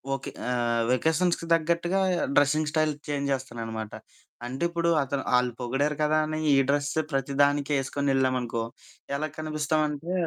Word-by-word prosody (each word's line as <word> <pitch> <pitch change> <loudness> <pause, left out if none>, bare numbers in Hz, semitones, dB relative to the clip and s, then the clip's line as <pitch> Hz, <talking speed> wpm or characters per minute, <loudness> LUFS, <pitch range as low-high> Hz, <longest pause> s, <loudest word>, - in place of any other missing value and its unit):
Okay. 135 - -6 0.6
వెకేషన్స్‌కి 160 +6 +1
తగ్గట్టుగా 170 +3 +1 0.4
dressing 150 +2 +3
style 155 -1 +2 0.2
change 140 -1 -1
జేస్తాననమాట. 115 -4 -4 0.5
అంటే 130 +6 -4
ఇప్పుడు 170 0 0
అతను 135 0 -3
ఆళ్ళు 125 0 +2
పొగిడారు 135 +5 0
కదా! 155 +1 +3
అని 155 0 -3 0.2
ఈ - - +4
డ్రెస్సే 145 +2 +1
ప్రతిదానికి 140 +1 +1
యేసుకొనెళ్ళామనుకో 130 -3 0 0.5
ఎలా 155 +2 -1
కనిపిస్తామంటే 155 +1 -1
145 Hz, 115 wpm, -27 LUFS, 135-155 Hz, 0.6 s, ఈ